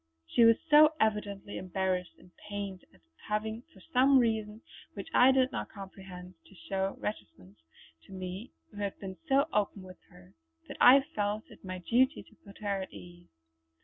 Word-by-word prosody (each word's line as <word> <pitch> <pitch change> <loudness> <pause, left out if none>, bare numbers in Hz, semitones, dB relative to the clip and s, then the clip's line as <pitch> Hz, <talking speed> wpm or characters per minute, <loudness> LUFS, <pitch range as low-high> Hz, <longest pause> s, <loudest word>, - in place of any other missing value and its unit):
She 235 - +3
was 230 0 +6
so 305 0 +7
evidently 205 -2 -1
embarrassed 185 -1 -2
and 180 - -20 0.2
pained 200 -2 -5
at - - -24 0.3
having 220 +2 -2
for - - -18
some 265 +2 +6
reason 220 -2 0 0.3
which - - -7
I 255 +2 +7
did 260 0 +2
not - - -4
comprehend 190 -2 -10
to 195 - -18
show 195 +1 -3
reticence 100 - -7 0.5
to - - -16
me 185 +4 -7 0.2
who 205 - -14
had 200 -1 -3
been 190 -1 -7
so 275 +2 +4
open 205 -1 0
with 185 -1 -12
her, 180 +1 -18 0.3
that - - -8
I 270 +3 +9
felt 215 -7 -3
it - - -16
my 185 -1 -5
duty 250 - +1
to - - -22
put 200 -1 -14
her 200 -2 -1
at 190 - -7
ease. 175 0 -13
205 Hz, 175 wpm, -30 LUFS, 185-230 Hz, 0.5 s, I